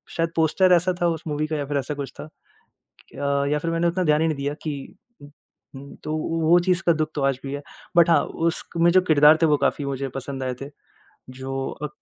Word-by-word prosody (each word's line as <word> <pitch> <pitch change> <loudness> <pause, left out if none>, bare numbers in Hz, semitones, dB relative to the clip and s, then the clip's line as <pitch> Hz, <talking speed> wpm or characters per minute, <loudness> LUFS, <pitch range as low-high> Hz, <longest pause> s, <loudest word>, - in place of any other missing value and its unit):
शायद 165 0 0
पोस्टर 180 +3 +3
ऐसा 180 +2 +1
था 175 - +3
उस 165 -2 -2
मूवी 150 0 -2
का 155 0 -2
या 145 - -3
फिर 145 +1 -2
ऐसा 140 +2 -2
कुछ 140 - -6
था। - - -5 0.7
अ, 140 0 -3
या 150 - +1
फिर 165 +3 -3
मैंने 165 +1 0
उतना 180 +2 -1
ध्यान 150 -1 +3
ही - - +2
नहीं 155 - -1
दिया 140 +1 -3
कि 145 +3 -6 0.3
उम 145 - -12 0.5
उम, 140 - -12
तो 155 0 -2 0.3
वो 170 +2 +6
चीज़ 180 -2 +2
का 170 - +6
दुःख 155 -1 -1
तो 145 - -2
आज 135 -2 +1
भी 135 - -5
है 145 - -5 0.3
बट 170 -1 +6
हाँ, - - +5
उसमें 170 +1 0
जो 185 - +6
किरदार 155 -2 +6
थे - - +6
वो 150 -2 +3
काफ़ी 145 - -2
मुझे 135 0 -3
पसंद 135 0 -5
आए 130 -1 -2
थे। 140 - -7 0.7
जो 135 0 -4
अ 150 - -1
150 Hz, 235 wpm, -23 LUFS, 140-165 Hz, 0.7 s, वो